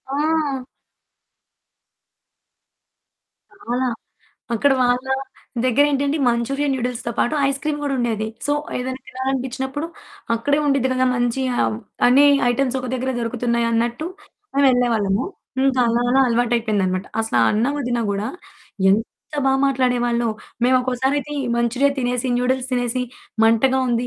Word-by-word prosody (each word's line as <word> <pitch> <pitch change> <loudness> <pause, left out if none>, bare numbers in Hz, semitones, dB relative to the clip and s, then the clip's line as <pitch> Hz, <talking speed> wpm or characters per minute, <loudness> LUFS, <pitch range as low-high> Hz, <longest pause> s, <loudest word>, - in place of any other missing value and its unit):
ఆ! 295 -4 0 2.9
చాలా. 255 -9 -2 0.7
అక్కడ 275 +5 +3
వాళ్ళ 245 +1 +2 0.6
దెగ్గరేంటంటే 285 +3 +2
మంచూరియా 275 +5 0
నూడిల్స్‌తో 245 -2 -3
పాటు 245 - +1
ఐస్ 275 0 -1
క్రీమ్ 300 -1 -1
గూడా 280 -2 -1
ఉండేది. 220 -3 -1 0.2
సో, 290 - +1 0.3
ఏదైనా 260 +1 -4
తినాలనిపించినప్పుడు 265 +3 -3 0.5
అక్కడే 285 +6 +1
ఉండిద్ది 275 -2 +2
గదా 255 0 +2
మంచి 245 +2 0 0.6
అన్ని 270 +4 +6 0.3
ఐటెమ్స్ 260 +1 0
ఒక 255 - -5
దగ్గరే 260 +1 -2
దొరుకుతున్నాయి 235 0 0
అన్నట్టు 235 +6 0 0.5
మేమెళ్ళేవాళ్ళము. 245 -6 +2 0.4
ఇంకా 260 -2 +2
అలా 235 +1 +1
అలా 270 +1 +4
అలవాటయిపోయిందన్నమాట. 225 -6 0
అసల 225 - -4
ఆ - - +5
అన్న 220 +4 +1
వదిన 245 -3 -1
గూడా 200 +2 -2 0.6
ఎంత 220 +3 +3 0.4
బా 265 - +4
మాట్లాడేవాళ్ళో 245 -3 +1 0.4
మేము 255 +1 +4
ఒక్కోసారయితే 265 +3 -1 0.2
మంచూరియా 245 +4 +2
తినేసి 250 0 -1
నూడిల్స్ 260 +1 0
తినేసి 245 0 0 0.4
మంటగా 240 +4 +4
ఉంది. 240 +1 0
250 Hz, 115 wpm, -21 LUFS, 235-270 Hz, 2.9 s, అన్ని